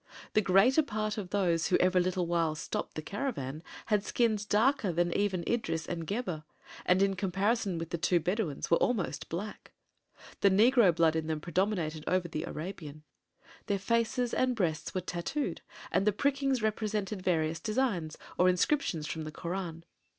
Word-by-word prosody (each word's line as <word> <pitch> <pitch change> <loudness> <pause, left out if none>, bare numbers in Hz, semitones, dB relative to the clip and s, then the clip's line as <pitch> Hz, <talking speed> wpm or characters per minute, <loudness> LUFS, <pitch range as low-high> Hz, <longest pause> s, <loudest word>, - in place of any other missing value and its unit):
The 215 - +4
greater 200 +10 +5
part 215 -6 -2
of 190 -3 -6
those 175 -4 +1
who 180 - +3
every 185 0 +3
little 180 0 0
while 165 -2 +1
stopped 155 - -4
the 155 - -4
caravan 160 - -4 0.2
had 210 -3 +1
skins 215 -2 +1
darker 220 -1 +2
than 175 +1 0
even 190 -4 0
Idris 195 -9 -1
and 165 -2 -4
Gebhr, 195 -8 -3 0.4
and 185 +2 +5
in 195 -1 +2
comparison 195 +1 0
with 165 0 -5
the 170 - -2
two 175 +1 +3
Bedouins 175 -3 -2
were 170 - +6
almost 190 -11 -1
black. 200 +6 -6 0.7
The 200 - +5
negro 215 -2 +5
blood 160 -1 +3
in 160 -1 -1
them 160 -1 -1
predominated 170 -2 -1
over 185 -1 +1
the 155 -1 -4
Arabian. 155 -3 -7 0.6
Their 200 - +1
faces 230 +4 0
and 255 -1 +2
breasts 165 -5 -1
were 185 - 0
tattooed 180 - -3 0.3
and 195 - +1
the - - +6
prickings 275 0 +1
represented 215 -2 -1
various 165 -3 0
designs, 210 -9 -1 0.2
or 180 +1 +6
inscriptions 180 - +1
from 160 - -4
the 155 - -6
Koran. 170 0 -5
185 Hz, 165 wpm, -31 LUFS, 165-215 Hz, 0.7 s, were